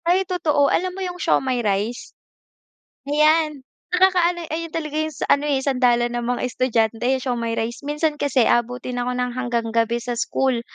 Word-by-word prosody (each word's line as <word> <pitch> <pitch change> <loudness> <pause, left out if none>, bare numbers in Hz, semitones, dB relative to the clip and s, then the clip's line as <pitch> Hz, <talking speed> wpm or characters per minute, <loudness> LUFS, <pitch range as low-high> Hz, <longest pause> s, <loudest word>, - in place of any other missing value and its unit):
Ay, 365 +3 +3
totoo 310 -6 +1
alam 365 +1 0
mo - - -5
yung 360 0 -6
siomai 260 -6 +1
rice? 210 +2 -2 0.9
Ayan, 305 -1 +2 0.2
nakakaano 360 -2 +2
ayun 330 +1 -3
talaga 310 -2 -4
yung 315 0 -2
sa - - -2
ano, 290 +1 -1
eh, 280 - +2
sandalan 245 -3 +1
ng 240 0 -2
mga 245 -1 -1
estudyante 235 -2 0
siomai 235 -3 -2
rice 230 +1 -3
minsan 295 +1 -1
kasi 270 -4 +2
aabutin 245 +1 0
ako 245 +1 -1
ng 250 0 -1
hanggang 240 -2 -2
gabi 230 0 +1
sa 240 +1 -4
school, 245 +1 0
255 Hz, 170 wpm, -22 LUFS, 240-310 Hz, 0.9 s, Ay